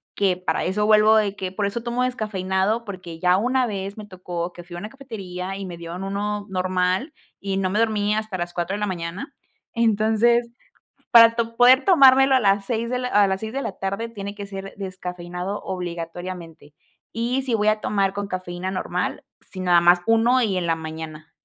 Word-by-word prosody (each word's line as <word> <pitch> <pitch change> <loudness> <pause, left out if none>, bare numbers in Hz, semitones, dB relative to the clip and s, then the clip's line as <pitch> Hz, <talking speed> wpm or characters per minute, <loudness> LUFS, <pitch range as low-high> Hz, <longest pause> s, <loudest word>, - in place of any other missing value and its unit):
que 190 -3 +1
para 180 -3 -1
eso, 210 +3 0
vuelvo 215 0 +6
de 205 -2 +1
que, 190 -2 -4
por 200 +2 -2
eso 215 +4 -3
tomo 240 +1 -1
descafeinado, 215 -2 -1
porque 180 -5 -8
ya 180 +1 +4
una 250 +6 +1
vez 200 -1 -5
me 215 - -8
tocó 180 -3 -5
que 175 - -10
fui 175 0 -9
a - - -5
una 205 - -6
cafetería, 195 -8 -7
y 195 - -5
me 180 -2 -7
dieron 170 +3 -7
uno 205 +1 -3
normal, 185 - 0 0.3
y 195 -1 -2
no 190 -1 0
me 205 +3 0
dormí 210 -2 +1
hasta 215 -3 -3
las 175 0 -4
4:00. 185 +5 -3 0.4
Entonces, 230 +1 +2 0.6
para 230 -1 +8
to 230 0 -1
poder 255 +3 +6
tomármelo 270 -6 +6
a 260 - +3
las 200 -1 +2
seis 230 +1 -2
de 250 0 -1
la 250 - -2
a 205 -4 +4
las 190 0 -1
18:00, 220 -2 -4
tiene 200 -2 -7
que 205 -1 -6
ser 195 0 -7
descafeinado 180 0 -5
obligatoriamente. 170 -3 -6 0.4
Y 240 +4 -1
si 255 -3 -2
voy 215 -1 +3
a 215 0 +1
tomar 200 -2 0
con 205 0 -4
cafeína 185 -1 -4
normal, 185 - -3 0.2
sí, 185 - -9
nada 175 -1 +5
más 175 +1 +5
uno 230 +3 +4
y 205 -5 0
en 175 -2 -1
la 165 - +2
mañana. 160 -1 -8
200 Hz, 190 wpm, -23 LUFS, 180-225 Hz, 0.6 s, para